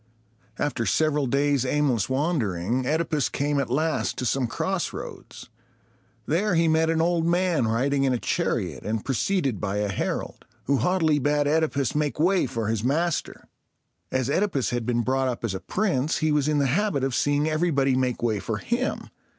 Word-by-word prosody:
After 130 -5 -1
several 150 +4 +1
days' 140 0 +2
aimless 130 -5 +1
wandering, 130 - 0
OEdipus 155 -2 0
came 145 0 0
at 135 - -1
last 155 +5 0
to 125 - -2
some 130 0 +1
crossroads. 115 - -4 0.8
There 180 +5 +1
he 165 0 +3
met 160 0 +3
an 165 0 +2
old 170 0 +1
man 175 -7 +2
riding 135 +5 +1
in 135 - +2
a 125 - +1
chariot, - - -2
and 110 0 -3
preceded 135 - 0
by 100 -1 -2
a 105 0 0
herald, 95 - -3 0.2
who 140 +1 +1
haughtily 160 -3 +2
bade 145 +1 +1
OEdipus 145 -4 +1
make 150 -1 -1
way 180 +4 +3
for 115 -4 -3
his 110 -1 -1
master. 160 +6 -1 0.6
As 130 -2 0
OEdipus 145 -3 0
had 120 -1 -2
been 120 -1 +1
brought 130 +2 0
up 125 -2 -3
as 115 -4 -1
a 95 - -3
prince, 165 - 0
he 155 0 +1
was 150 -1 +2
in 150 -1 +1
the 140 - +2
habit 155 +1 +1
of 135 -1 0
seeing 145 +4 +1
everybody 155 -4 +1
make 130 -2 -1
way 110 -3 +1
for 110 +2 -3
him. 240 - -2
140 Hz, 175 wpm, -25 LUFS, 125-160 Hz, 0.8 s, he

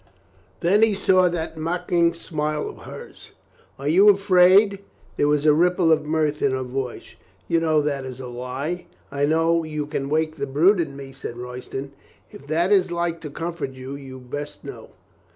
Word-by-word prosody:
Then 195 +4 +3
he 220 -2 +4
saw 185 -2 +3
that 165 -1 -4
mocking 170 +1 0
smile 150 -2 -3
of - - -8
hers. - - -11 0.4
"Are 140 - -5
you 190 +7 +6
afraid?" 195 0 +5 0.4
There 145 - +2
was 150 0 +1
a 150 - +6
ripple 175 +1 +3
of 155 -1 +2
mirth 155 -1 0
in 135 - +2
her 130 0 -1
voice. 125 -1 -5 0.3
"You 165 - +2
know 155 -2 +2
that 140 -2 -2
is 130 -1 -8
a 130 - -7
lie." 130 +8 -5 0.2
"I 140 0 0
know 165 +2 +2
you 150 -1 -4
can 140 -2 -4
wake 155 +1 0
the 140 -1 -3
brute 170 +9 +4
in 150 -5 -2
me," 135 -1 -9
said 120 -2 -7
Royston. 125 +2 -7 0.4
"If 140 - -13
that 170 +5 +1
is 190 -3 +4
like 170 -1 -2
to 150 - -6
comfort 165 -2 -5
you, 130 +1 -8
you 135 -2 -9
best 145 +4 -7
know." - - -9
155 Hz, 185 wpm, -23 LUFS, 140-175 Hz, 0.4 s, you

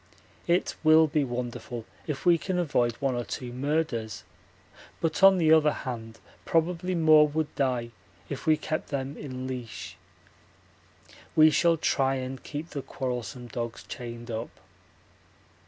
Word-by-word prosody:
It 175 +1 +2
will 160 0 +7
be 150 -1 +1
wonderful 120 -2 -5 0.2
if 150 +1 -4
we 170 -2 +5
can 185 +1 -2
avoid 130 -9 +1
one 135 +2 -1
or 120 0 -2
two 120 0 -6
murders, 130 -6 -2 0.8
but 160 -1 -1
on 195 0 +8
the 160 -2 +5
other 155 -1 +5
hand 115 -5 -6 0.3
probably 175 +2 0
more 155 -2 +6
would 155 +1 -2
die 125 -4 -1 0.4
if 140 +3 -6
we 155 -1 +5
kept 155 +1 -3
them 140 0 -3
in 130 -3 -6
leash. 125 -4 -6 1.4
We 155 0 +7
shall 170 +1 +3
try 135 -3 +1
and 130 0 -5
keep 155 +3 -6
the 140 - -4
quarrelsome 125 -2 -4
dogs 115 0 -5
chained 120 -1 -7
up. 115 +1 -4
140 Hz, 140 wpm, -27 LUFS, 120-160 Hz, 1.4 s, on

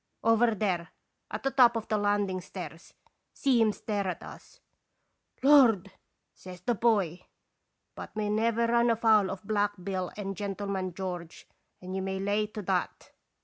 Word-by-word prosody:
Over 230 0 +4
there, 180 -6 -1 0.4
at - - -5
the 270 - 0
top 245 -3 +5
of 225 -1 -3
the 215 -1 0
landing 205 -2 0
stairs. 180 - -9 0.4
See 260 -5 +2
him 220 -1 +4
stare 205 -2 -3
at 180 - -4
us! - - -13 0.3
' - - -49
" - - -37
'Lord!' 245 -10 +5 0.4
says 180 -1 -11
the 240 +6 0
boy. 200 -7 +1 0.4
" - - -52
But - - -8
we 210 -1 -1
never 230 +2 +1
run 235 +1 +3
afoul 220 -3 +4
of 195 -1 -6
Black 205 -1 +1
Bill 185 -2 -3
and 195 -1 -4
Gentleman 195 -2 -3
George, 180 -3 -6 0.3
and 185 +1 -6
you 190 - -2
may 190 0 -3
lay 205 +2 0
to 210 0 -7
that. 185 -1 -2
205 Hz, 170 wpm, -29 LUFS, 190-225 Hz, 0.4 s, top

